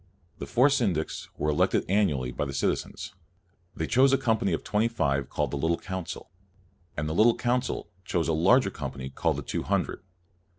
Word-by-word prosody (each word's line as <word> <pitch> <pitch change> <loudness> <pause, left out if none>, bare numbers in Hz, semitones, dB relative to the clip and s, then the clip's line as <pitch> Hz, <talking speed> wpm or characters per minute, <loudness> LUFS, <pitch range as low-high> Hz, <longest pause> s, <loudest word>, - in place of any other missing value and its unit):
The - - -5
four 130 +4 +4
syndics 95 - -1
were 75 - 0
elected 75 - +2
annually 75 -11 +1
by 65 - -2
the 70 -1 -5
citizens. - - -2 0.6
They 80 - -2
chose 130 +6 +4
a 135 - +4
company 110 -6 +1
of 80 - -1
twenty 105 +2 +1
five 70 - -1
called - - -1
the 70 - -2
Little 80 +3 +1
Council, 95 -3 -6 0.7
and 75 0 -1
the 80 - -2
Little 115 +6 +5
Council 125 +1 -1 0.2
chose 85 -2 -1
a 80 - +1
larger 95 +7 +4
company 65 -3 -6
called - - 0
the - - -4
Two - - -3
Hundred. - - -1
90 Hz, 180 wpm, -27 LUFS, 75-115 Hz, 0.7 s, Little